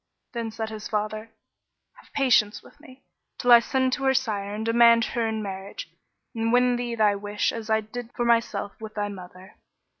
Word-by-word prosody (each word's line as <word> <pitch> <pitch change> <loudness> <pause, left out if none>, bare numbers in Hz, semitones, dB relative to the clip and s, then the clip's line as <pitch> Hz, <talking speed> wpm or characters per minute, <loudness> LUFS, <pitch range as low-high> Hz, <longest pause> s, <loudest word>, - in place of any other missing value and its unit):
Then 230 -2 -3
said 220 0 -5
his 215 -1 -7
father, 215 +1 -3 0.7
"Have - - -19
patience 245 -6 +2
with 290 - -18
me, 270 -3 -16 0.3
till 245 - +1
I 240 - +10
send 260 +1 0
to 270 - -2
her 265 0 +3
sire 200 -4 -1
and 215 +2 -4
demand 230 0 +5
her 230 -1 0
in 220 -1 -3
marriage, 195 - -7 0.4
and 225 -1 -1
win 250 0 +4
thee 240 -1 -3
thy 210 -2 +3
wish 205 +1 -1
as 225 -1 -7
I 220 0 +3
did 235 +2 -8
for 240 - -1
myself 230 -4 +1
with 215 -1 -8
thy 205 -1 -2
mother. 185 0 -12
225 Hz, 190 wpm, -25 LUFS, 210-240 Hz, 0.7 s, I